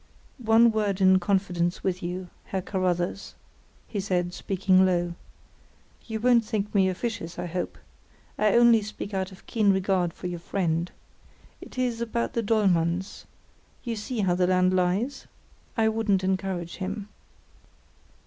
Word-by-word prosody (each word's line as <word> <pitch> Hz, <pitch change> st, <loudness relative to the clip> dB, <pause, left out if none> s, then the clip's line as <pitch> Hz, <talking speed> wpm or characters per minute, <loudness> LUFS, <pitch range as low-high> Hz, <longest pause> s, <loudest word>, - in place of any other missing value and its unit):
"One 230 Hz, 0 st, +5 dB
word 210 Hz, -3 st, 0 dB
in 190 Hz, -1 st, +5 dB
confidence 180 Hz, -2 st, 0 dB
with 185 Hz, -1 st, -1 dB
you, 180 Hz, +1 st, -5 dB
Herr 190 Hz, -1 st, -3 dB
Carruthers," 185 Hz, -1 st, -2 dB, 0.5 s
he 210 Hz, -, -4 dB
said, 180 Hz, -2 st, -1 dB
speaking 190 Hz, 0 st, +2 dB
low. 175 Hz, -2 st, +1 dB, 0.9 s
"You 220 Hz, -1 st, -3 dB
won't 240 Hz, 0 st, +4 dB
think 210 Hz, -2 st, -3 dB
me 190 Hz, -2 st, +4 dB
officious, 185 Hz, -3 st, -4 dB
I -, -, -3 dB
hope. 180 Hz, +1 st, -4 dB, 0.6 s
I 215 Hz, -1 st, +2 dB
only 235 Hz, -2 st, +6 dB
speak 210 Hz, 0 st, -7 dB
out 190 Hz, 0 st, -2 dB
of 190 Hz, -, -15 dB
keen 215 Hz, -3 st, +2 dB
regard 190 Hz, -2 st, +1 dB
for 180 Hz, -, -12 dB
your 175 Hz, -1 st, -3 dB
friend. 170 Hz, -1 st, -1 dB, 0.7 s
It -, -, -12 dB
is 245 Hz, -2 st, -1 dB
about 235 Hz, 0 st, -2 dB
the 230 Hz, -, 0 dB
Dollmanns—you 195 Hz, +3 st, -2 dB
see 220 Hz, +2 st, -3 dB
how 185 Hz, -3 st, +2 dB
the 180 Hz, 0 st, +2 dB
land 185 Hz, 0 st, +3 dB
lies? 185 Hz, +9 st, 0 dB, 0.5 s
I 225 Hz, -1 st, +3 dB
wouldn't 220 Hz, -4 st, +1 dB
encourage 185 Hz, -2 st, -2 dB
him." 200 Hz, +2 st, -4 dB
190 Hz, 140 wpm, -26 LUFS, 180-215 Hz, 0.9 s, only